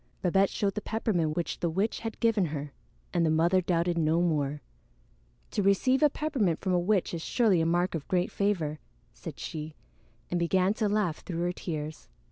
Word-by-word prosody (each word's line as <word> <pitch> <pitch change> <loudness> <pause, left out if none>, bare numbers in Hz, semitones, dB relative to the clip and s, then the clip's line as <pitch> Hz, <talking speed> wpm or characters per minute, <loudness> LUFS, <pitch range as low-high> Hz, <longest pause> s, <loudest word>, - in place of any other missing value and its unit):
Babette 195 +2 +3
showed 200 -1 -1
the 210 - -3
peppermint 180 -9 -1
which 170 -1 -2
the 170 - 0
witch 195 +7 -1
had 225 -1 -6
given 225 -5 +3
her, 145 -2 -5 0.4
and 175 -2 +2
the 160 - +3
mother 170 +4 +3
doubted 170 -1 0
no 160 +1 +2
more. 150 -4 0 0.9
"To 205 - 0
receive 200 +8 +3
a 300 - +6
peppermint 265 - 0
from 190 -2 -1
a 180 - +3
witch 190 +1 +1
is 170 - -3
surely 205 -3 +2
a 160 - +1
mark 175 +2 +1
of 160 -4 -4
great 180 0 +1
favor," 170 -7 -1 0.3
said - - -8
she, 155 0 -6 0.6
and 175 - +1
began 185 +3 +2
to 215 -1 0
laugh 200 -6 +1
through 170 -2 -5
her 175 - +1
tears. 155 -3 -6
175 Hz, 190 wpm, -29 LUFS, 165-205 Hz, 0.9 s, a